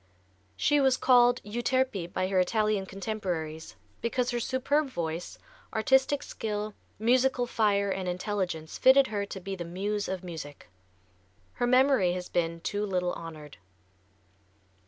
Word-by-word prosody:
She 295 0 +3
was 265 -1 +3
called 245 -1 +4
"Euterpe" 235 -4 -1
by 185 - -1
her 190 -1 +2
Italian 210 +1 +1
contemporaries 185 -6 -4 0.3
because 245 +2 0
her 240 - -1
superb 275 +5 0
voice, 170 -5 -4 0.4
artistic 265 +5 +3
skill, 210 -1 -4 0.2
musical 250 +3 +2
fire 205 -4 +1
and 185 -1 -2
intelligence 180 -4 -3
fitted 265 +1 +7
her 205 -2 -2
to 195 - -6
be 195 +1 -5
the 175 - -5
muse 200 +4 -3
of 190 -1 -4
music. 155 - -8 0.8
Her 245 - -1
memory 255 -7 +4
has 180 0 -5
been 170 -1 -1
too 205 +4 -2
little 180 -3 -1
honored. 155 - -9
205 Hz, 135 wpm, -28 LUFS, 180-245 Hz, 0.8 s, fitted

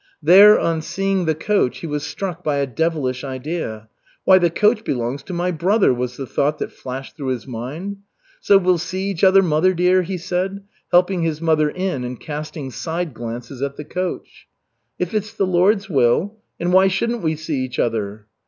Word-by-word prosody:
There 200 +6 +8
on 165 -1 0
seeing 195 +2 -1
the 160 -1 +1
coach, 180 -5 0
he - - -5
was 150 -2 -3
struck 180 -1 -5
by 150 -2 0
a 140 0 +1
devilish 135 -2 -1
idea. 130 -5 -5 0.4
"Why, 190 0 +6
the 175 -1 +3
coach 210 +6 +2
belongs 125 - -2
to 160 - -10
my 175 +1 -1
brother," 185 - +2
was 125 0 -4
the 135 - -4
thought 145 +4 0
that - - -4
flashed 130 +1 -8
through 140 -3 -6
his 130 -2 -2
mind. 140 - -6 0.4
"So 200 - +5
we'll 185 -2 +2
see 185 +4 -3
each 180 -2 -6
other, 195 0 +6
mother 180 +2 +2
dear?" 180 +2 +3
he 185 +1 -4
said, 185 +3 -3 0.3
helping 180 +1 +3
his 160 -2 -1
mother 155 -2 +2
in 180 -6 -3
and 125 -1 -6
casting 150 -2 -6
side 165 +5 -4
glances 120 +3 -7
at 140 0 -2
the 150 - -7
coach. 180 +4 -5 0.5
"If 180 +1 -3
it's 210 -1 -2
the 195 - +1
Lord's 195 +4 +2
will 160 - +1 0.2
and 175 +1 0
why 190 +1 +6
shouldn't 230 +5 -1
we 160 -1 0
see 155 -2 -3
each 130 -1 -6
other?" 105 -2 -2
165 Hz, 190 wpm, -20 LUFS, 135-185 Hz, 0.5 s, There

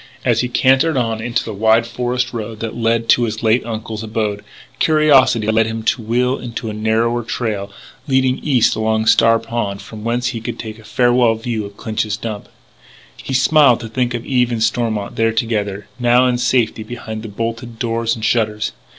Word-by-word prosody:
As 120 -3 +3
he 125 - -1
cantered 135 +5 +3
on 115 -3 -1
into 120 +1 -1
the - - -6
wide 110 +3 +3
forest 125 +1 -2
road 110 -1 -5
that 115 -1 -4
led 115 0 0
to 120 - +5
his 110 0 -5
late 115 +2 +3
uncle's 110 -1 -5
abode, 110 -2 -3 0.4
curiosity 145 -8 +4
led 110 +1 +2
him 115 0 -4
to 130 +2 0
wheel 125 +4 0
into 115 -2 -5
a - - -6
narrower 110 +2 0
trail 110 -4 -3 0.4
running 130 -1 +2
east 130 -6 +2
along 110 0 0
Star 115 0 +5
Pond, 115 -3 -3
and 100 - -10
from 110 -1 -10
whence 120 +2 0
he 115 -3 -5
could - - -5
take 110 -1 -8
a - - -15
farewell 120 +1 +2
view 110 -1 -3
of 100 0 -16
Clinch's 110 -1 -2
Dump. 105 -1 -6 0.7
He 135 - -5
smiled 135 -2 +5
to 115 - -6
think 120 +1 -1
of 120 - -5
Eve 125 -2 +1
and 115 -2 0
Stormont 110 -3 -1
there 115 0 +2
together, 105 -3 -2
and - - -7
now 120 +1 +5
in 125 -1 +1
safety 120 -3 +1
behind 110 -2 -7
bolted 115 0 -4
doors 115 0 -1
and 110 -1 -4
shutters. 105 -2 0
115 Hz, 195 wpm, -18 LUFS, 110-120 Hz, 0.7 s, to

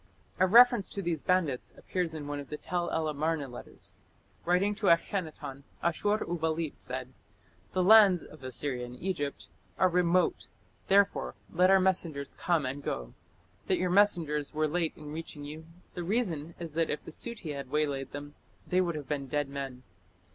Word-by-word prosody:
A 185 - +5
reference 240 0 +7
to 200 - -4
these 170 -2 -1
bandits 170 -9 0
appears 175 -3 -2
in 150 -2 -5
one 145 0 -4
of 140 - -8
the 150 - -4
Tell 175 +3 -2
el 160 -1 0
Amarna 155 0 -1
letters. 125 -1 -9 0.5
Writing 180 +4 +3
to 205 -1 -2
Akhenaton, 165 -5 0 0.2
Ashur 205 +5 +1
uballit 160 -2 -1
said: 130 0 -4 0.6
"The 185 - +2
lands 200 -3 +7
(of 155 -3 -14
Assyria 130 0 -1
and 125 +1 -8
Egypt) 145 - -3 0.3
are 185 - +4
remote, 180 0 +2 0.4
therefore 200 +1 +3 0.2
let 180 +2 +4
our 195 0 +7
messengers 170 -7 0
come 170 -5 0
and 135 +2 -3
go. - - -4 0.5
That 185 - +3
your 180 0 0
messengers 165 -8 +2
were 155 0 +2
late 165 +1 0
in 150 -1 -9
reaching 160 -2 -6
you, 155 +2 -8 0.3
(the 175 - -4
reason 170 -6 -1
is 165 -3 -7
that) 165 +1 +1
if 150 - -3
the - - -9
Suti 215 -4 -4
had 140 -2 -6
waylaid 145 -2 -1
them, 145 +1 -7 0.3
they 185 +1 +2
would 170 -3 -1
have 145 -3 -6
been 140 -1 -2
dead 145 +1 -1
men. 135 -2 -6
160 Hz, 175 wpm, -30 LUFS, 145-180 Hz, 0.6 s, reference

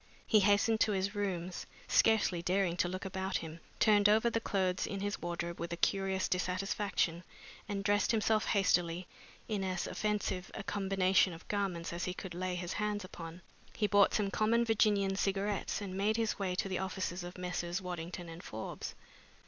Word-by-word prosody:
He 215 - +5
hastened 205 +2 +4
to 215 - +3
his 195 +1 0
rooms, 185 -4 -3 0.2
scarcely 215 -6 +3
daring 180 0 +1
to 175 - +2
look 185 +2 -4
about 190 0 -2
him, 160 0 -7 0.2
turned 205 -1 +5
over 220 +3 +4
the 230 - +1
clothes 190 -4 0
in 200 - -4
his 205 +1 -3
wardrobe 170 0 -3
with 170 0 -4
a - - -4
curious 190 0 +1
dissatisfaction, 180 -1 0 0.5
and 200 -1 -2
dressed 205 0 +2
himself 220 -1 +2
hastily 180 -3 +2 0.4
in 210 -3 -1
as 185 -1 -1
offensive 210 -3 -2
a - - -5
combination 195 -2 +2
of 165 - -12
garments 190 -5 -1
as 170 - -2
he 180 - -3
could 190 -3 -7
lay 180 +1 -2
his 175 0 -3
hands 210 -1 -1
upon. 170 0 -9 0.3
He 215 - +1
bought 205 -1 +4
some 200 -2 +1
common 230 +4 +2
Virginian 205 -3 +3
cigarettes 200 +1 -1
and 195 -2 -5
made 210 +3 +1
his 225 -2 0
way 185 -2 -1
to 190 - -1
the 185 -2 -2
offices 185 -1 -3
of 175 +1 -8
Messrs. 175 0 -2
Waddington 175 -1 -5
and 165 +1 -9
Forbes. 110 -8 -6
190 Hz, 180 wpm, -33 LUFS, 180-205 Hz, 0.5 s, He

